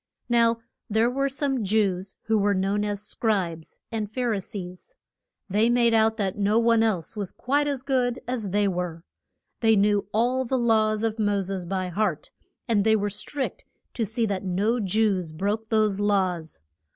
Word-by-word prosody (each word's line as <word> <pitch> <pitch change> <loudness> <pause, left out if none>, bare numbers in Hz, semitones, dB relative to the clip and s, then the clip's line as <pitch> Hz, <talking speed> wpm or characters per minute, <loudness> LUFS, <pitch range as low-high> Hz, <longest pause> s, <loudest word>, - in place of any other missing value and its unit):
Now 235 -1 +4 0.3
there 220 +3 +2
were 275 +2 0
some 270 -3 -1
Jews 195 -2 0
who 220 -1 +1
were 200 0 +2
known 195 +2 0
as 205 0 -3
Scribes 185 -8 -2
and 215 -2 -3
Phar 245 0 -1
i 205 - -1
sees. 185 - -9 0.5
They 210 +4 +2
made 240 -1 +3
out 220 0 +3
that 195 -4 -1
no 205 +2 +2
one 230 -1 +4
else 210 -5 0
was 200 -4 -4
quite 290 +3 0
as 275 -3 -2
good 255 -2 0
as 240 -5 -2
they 205 +2 +2
were. 175 -3 -3 0.6
They 225 -1 +4
knew 205 -1 +2
all 245 +4 +1
the 260 +1 -1
laws 220 -2 +2
of 225 0 -1
Mo 205 -2 +1
ses 185 -2 -5
by 185 0 -2
heart, 210 +5 -1 0.4
and 215 -4 +2
they 220 +1 +4
were 205 -1 -1
strict 270 +7 -4 0.3
to 235 - -1
see 225 +2 -1
that 200 -3 -2
no 200 +6 0
Jews 195 -4 +1
broke 205 +7 -2
those 215 -3 +2
laws. 185 -6 0
215 Hz, 175 wpm, -25 LUFS, 195-230 Hz, 0.6 s, Now